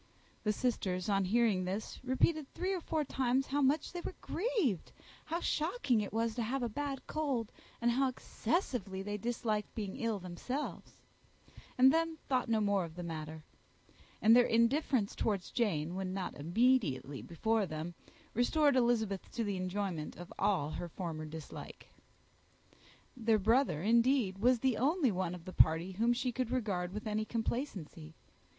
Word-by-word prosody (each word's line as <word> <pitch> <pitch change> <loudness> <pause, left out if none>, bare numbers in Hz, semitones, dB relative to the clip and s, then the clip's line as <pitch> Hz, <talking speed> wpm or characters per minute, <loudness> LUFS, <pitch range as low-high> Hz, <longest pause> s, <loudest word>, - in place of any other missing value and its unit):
The 215 - +2
sisters, 195 -5 -1
on 195 -1 +2
hearing 210 -2 +3
this, 190 +4 -4
repeated 270 +4 +1
three 375 +2 -1
or 365 - -2
four 315 -1 -1
times 260 0 +1
how 290 +1 0
much 285 +3 +2
they 350 - -4
were 370 - -6
grieved, 355 - -1 0.3
how 335 +2 -2
shocking 305 - +1
it 205 - -4
was 225 +1 0
to 240 - -2
have 250 +3 -1
a 240 - 0
bad 275 +3 -4
cold, 275 -8 -1 0.3
and 240 0 +2
how 265 +3 +2
excessively 230 - -2
they 205 +1 -3
disliked 220 -1 -2
being 205 -2 -4
ill 230 -5 -1
themselves; 195 +10 -5 0.8
and 260 +1 +7
then 325 0 +1
thought 255 -3 +1
no 225 -1 +3
more 200 -2 +2
of 165 -1 -8
the 175 - -5
matter: 155 -1 -6 0.8
and 225 +2 +8
their 245 0 +6
indifference 235 -1 +2
towards 200 -5 -1
Jane, 170 -9 0
when 190 0 -3
not 190 -2 -3
immediately 170 - +1
before 215 +4 0
them, 155 +2 -5 0.4
restored 285 +4 +3
Elizabeth 225 -6 +1
to 235 - -1
the 200 -3 -2
enjoyment 185 -3 -3
of 175 0 -9
all 190 -7 +1
her 175 - -5
original 155 -4 -4
dislike. 160 -1 -9 1.3
Their 225 -3 +3
brother, 220 - +2
indeed, 230 -2 +3
was 250 +4 +4
the 260 -4 +2
only 285 0 +2
one 180 -2 -2
of 170 -2 -12
the 185 - -7
party 165 +4 +4
whom 225 +6 +2
she 245 +1 0
could 250 -1 -2
regard 200 -8 -1
with 210 +4 -6
any 215 0 0
complacency. 215 - -4
225 Hz, 160 wpm, -34 LUFS, 185-255 Hz, 1.3 s, and